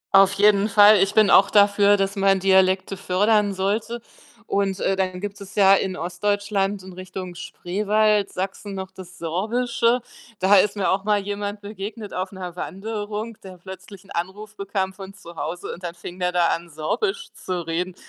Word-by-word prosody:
Auf 195 0 +6
jeden 205 +1 +4
Fall. 210 0 +7
Ich 195 +2 +1
bin 215 -2 +5
auch 195 +1 +6
dafür, 205 0 +5
dass 195 +1 -1
man 195 -1 +3
Dialekte 190 0 +2
fördern 205 +2 +1
sollte 215 +5 -2 0.5
und, 195 -1 -1
äh, 195 - +1
dann 185 -1 -2
gibt 205 0 -6
es 195 - -11
ja 195 -1 +6
in 190 -1 0
Ostdeutschland 200 +2 -1
in 190 0 -11
Richtung 185 0 -7
Spreewald, 210 +4 0
Sachsen 195 +2 -5
noch 190 0 -6
das 180 -1 -12
Sorbische, 235 +8 0 0.4
da 195 +2 +5
ist 205 +2 +3
mir 200 -2 0
auch 195 +1 0
mal 210 0 +2
jemand 205 +1 -4
begegnet 210 +1 -7
auf 185 +1 -3
'ner 180 -2 -7
Wanderung, 210 +3 -5
der 185 -2 -11
plötzlich 190 +2 -11
'n - - -18
Anruf 200 +5 -5
bekam 195 -1 -3
von 195 0 -10
zu 170 -3 -13
Hause 170 +3 -5
und 180 - -12
dann 175 0 -5
fing 175 +1 -9
der 180 0 0
da 175 -1 +2
an, 170 0 -3
Sorbisch 160 - -3
zu 180 -2 -5
reden. 175 +2 -3
195 Hz, 180 wpm, -23 LUFS, 185-205 Hz, 0.5 s, Fall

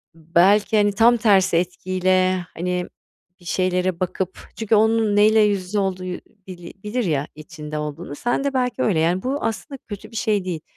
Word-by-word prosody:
belki, 185 +7 +3
hani, 205 0 +3
tam 235 +3 +4
tersi 190 -6 +3
etkiyle, 185 +1 0
hani, 180 +1 -2 0.5
bir 175 - -20
şeylere 180 0 0
bakıp, 185 0 -3 0.2
çünkü 220 0 +1
onun 220 -1 +3
neyle 215 +1 +5
yüz 205 -2 +3
yüze 200 +3 -2
olduğu 185 -2 -2 0.4
bili 175 -2 -10
bilir 230 +4 -2
ya, 145 -3 -1
içinde 155 -1 -8
olduğunu, 150 -1 -5
sen 240 - -1
de 280 -1 -1
belki 250 -3 -1
öyle, 185 -8 +1
yani, 175 +3 +1
bu 275 +3 -2
aslında 270 +5 -4
kötü 210 +2 -8
bir - - -13
şey 210 -4 0
değil. 170 -4 -4
185 Hz, 175 wpm, -21 LUFS, 180-215 Hz, 0.5 s, neyle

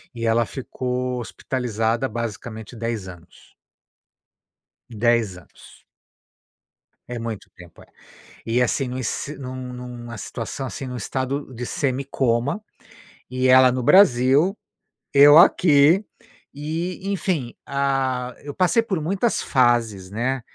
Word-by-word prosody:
e 115 0 -4
ela 115 +1 +3
ficou 125 0 -4
hospitalizada 120 0 -2
basicamente 110 0 -6
10 115 -3 -4
anos. 90 -2 -14 1.4
10 115 -4 +1
anos. 90 - -17 1.3
É 120 -1 -5
muito 115 -3 -6
tempo, 90 -1 -15
é. - - -22 0.6
E 120 +2 +1
assim, 125 +2 0
num 130 +1 -4
si 140 +4 -4
num 130 -1 -7 0.2
num 125 0 -8
numa 120 -1 -8
situação 115 +6 -5
assim, 135 - -6
num 125 -1 -5
estado 130 +4 -3
de 125 +1 -5
semicoma, 135 - -1 0.7
e 130 0 0
ela 130 0 +7
no 125 0 -2
Brasil, 145 - +5 0.6
eu 145 +1 +8
aqui 160 +2 +5 0.5
e 165 +6 -4
enfim, 170 -10 -2
ah, 135 -3 -1
eu 145 0 -7
passei 190 - +2
por 190 -7 -2
muitas 195 +8 0
fases, 115 -7 +1
né, 125 +5 -1
125 Hz, 120 wpm, -22 LUFS, 115-140 Hz, 1.4 s, eu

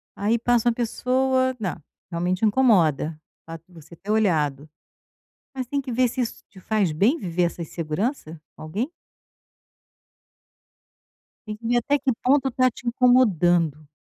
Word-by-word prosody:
Aí 215 +3 +1
passa 240 0 +2
uma - - +1
pessoa 260 +2 0
Não, 190 -5 -3 0.4
realmente 180 +4 0
incomoda, 175 - +2 0.3
fato 165 0 -9
de 185 - -23
você 160 0 -14
ter 200 +5 -6
olhado. 155 -9 0 0.9
Mas 260 -2 -4
tem 280 +3 -2
que 260 -2 -6
ver 250 +1 +2
se 245 - -4
isso 235 - -4
te 190 -2 -16
faz 205 -4 0
bem 210 - +2
viver 180 - -2
essa 170 0 -3
insegurança, 165 - -4 0.2
com - - -12
alguém? 205 - -3 2.6
Tem 215 0 -5
que 230 +2 -9
ver 240 +1 +2
até 285 +4 +1
que 270 -1 0
ponto 270 +1 +3
tá 255 +1 +3
te 240 - -14
incomodando. 175 - +3
215 Hz, 150 wpm, -23 LUFS, 170-250 Hz, 2.6 s, ponto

